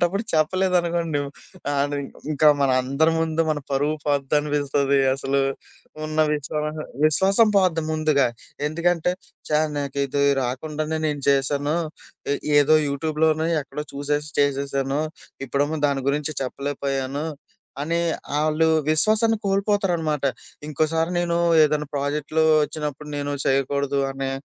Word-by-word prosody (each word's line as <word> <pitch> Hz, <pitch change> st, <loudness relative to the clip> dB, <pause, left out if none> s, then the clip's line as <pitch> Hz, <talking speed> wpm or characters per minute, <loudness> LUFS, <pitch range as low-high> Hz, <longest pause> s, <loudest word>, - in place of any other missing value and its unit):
అలాంటప్పుడు 185 Hz, +4 st, +1 dB
చెప్పలేదనుకోండి, 170 Hz, -1 st, +1 dB, 0.5 s
ఆన్ని 145 Hz, +1 st, 0 dB, 0.3 s
ఇంకా 150 Hz, +1 st, +5 dB
మన 135 Hz, -, +3 dB
అందరి 140 Hz, +5 st, +2 dB
ముందు 165 Hz, 0 st, +1 dB
మన 155 Hz, -, 0 dB
పరువు 145 Hz, +3 st, +1 dB
పోద్దనిపిస్తది 145 Hz, -1 st, +1 dB
అసలు. 135 Hz, 0 st, 0 dB, 0.6 s
ఉన్న 155 Hz, 0 st, -4 dB, 0.2 s
విశ్వాస 150 Hz, +1 st, -3 dB, 0.3 s
విశ్వాసం 195 Hz, +8 st, +4 dB
పోద్ది 180 Hz, -4 st, +3 dB
ముందుగా. 155 Hz, -3 st, +2 dB, 0.4 s
ఎందుకంటే, 170 Hz, +2 st, +1 dB, 0.4 s
ఛ! -, -, -15 dB, 0.3 s
నాకు 140 Hz, 0 st, -4 dB
ఇది 140 Hz, +1 st, -1 dB, 0.2 s
రాకుండానే 155 Hz, +5 st, -3 dB
నేను 145 Hz, -2 st, -2 dB
చేశాను. 145 Hz, +2 st, +1 dB, 0.6 s
ఎ -, -, +2 dB, 0.3 s
ఏదో 150 Hz, +2 st, +4 dB
యూట్యూబ్‌లోనో, 155 Hz, +2 st, 0 dB
ఎక్కడో 150 Hz, +1 st, -6 dB
చూసేసి 145 Hz, +1 st, -2 dB
చేసేశాను. 140 Hz, 0 st, 0 dB, 0.5 s
ఇప్పుడేమో 145 Hz, +4 st, 0 dB
దాని 140 Hz, -1 st, 0 dB
గురించి 150 Hz, +1 st, -1 dB
చెప్పలేకపోయాను 140 Hz, +1 st, -3 dB, 0.6 s
అని 165 Hz, +3 st, 0 dB, 0.4 s
ఆళ్ళు 155 Hz, +1 st, +2 dB, 0.2 s
విశ్వాసాన్ని 215 Hz, +8 st, +3 dB
కోల్పోతారనమాట. 195 Hz, -7 st, 0 dB, 0.4 s
ఇంకోసారి 160 Hz, +3 st, 0 dB
నేను 170 Hz, -1 st, 0 dB, 0.3 s
ఏదైనా 150 Hz, -1 st, +1 dB
ప్రాజెక్ట్‌లు 150 Hz, +2 st, 0 dB, 0.2 s
ఒచ్చినప్పుడు 150 Hz, -1 st, -5 dB
నేను 145 Hz, 0 st, -2 dB
చేయకూడదు 140 Hz, +1 st, +1 dB
అనే 135 Hz, 0 st, -3 dB
150 Hz, 110 wpm, -23 LUFS, 140-160 Hz, 0.6 s, ఇంకా